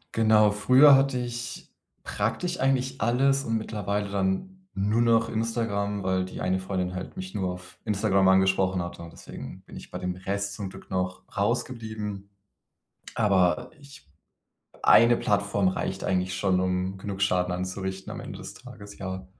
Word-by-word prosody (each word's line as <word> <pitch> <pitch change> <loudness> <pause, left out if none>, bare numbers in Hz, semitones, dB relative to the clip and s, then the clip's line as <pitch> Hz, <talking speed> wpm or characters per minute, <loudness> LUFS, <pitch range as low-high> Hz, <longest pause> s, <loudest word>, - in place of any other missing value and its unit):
Genau. 110 -2 +5
Früher 130 +7 +7
hatte 135 -1 +2
ich 120 0 -6 0.3
praktisch 175 - -2
eigentlich 130 0 0
alles 135 +4 +2
und 115 -4 0
mittlerweile 105 -2 -2
dann 100 - -2
nur 105 +4 +1
noch 115 -1 +3
Instagram, 110 -3 -2
weil 95 0 +1
die 95 - -7
eine 95 +1 0
Freundin 90 -1 -3
halt 95 - -7
mich 185 0 -7
nur 95 -2 -1
auf 90 0 -11
Instagram 100 -2 +2
angesprochen 95 -1 +3
hatte. 85 0 -6
Und 85 - -10
deswegen - - -10
bin - - -13
ich - - -10
bei - - -5
dem 90 0 -3
Rest 100 +2 -3
zum 100 -2 -5
Glück - - -13
noch 90 -1 -2
rausgeblieben. 110 -5 -3 0.9
Aber 95 -5 +2
ich 140 - -15 0.8
1 115 +1 +7
Plattform 100 -3 +1
reicht 95 0 -3
eigentlich 95 -1 0
schon, 95 0 +1
um 95 +1 -1
genug 95 0 -6
Schaden 90 -2 +1
anzurichten 95 +1 -4
am - - -6
Ende - - -8
des - - -8
Tages, 100 0 -12
ja. 95 -1 -5
100 Hz, 160 wpm, -26 LUFS, 95-115 Hz, 0.9 s, Früher